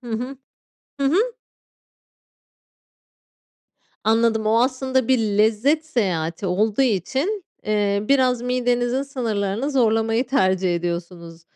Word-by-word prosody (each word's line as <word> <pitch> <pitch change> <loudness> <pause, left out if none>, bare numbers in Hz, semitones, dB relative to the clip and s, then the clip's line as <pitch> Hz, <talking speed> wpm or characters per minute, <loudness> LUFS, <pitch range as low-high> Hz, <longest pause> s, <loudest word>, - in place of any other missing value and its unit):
Hı 240 - -9
hı, 250 +5 -4 0.6
hı 275 - +1
hı. 410 - +2 2.7
Anladım, 225 0 +2
o 220 +1 +3
aslında 260 0 0
bir 260 -1 +4
lezzet 220 +8 +1
seyahati 185 - -2
olduğu 210 +6 +1
için, 270 - -1 0.2
eee, 205 -1 0
biraz 255 -3 +3
midenizin 245 +1 0
sınırlarını 230 -2 -2
zorlamayı 225 -1 +1
tercih 190 -7 +1
ediyorsunuz. 170 -1 -5
225 Hz, 100 wpm, -22 LUFS, 200-260 Hz, 2.7 s, bir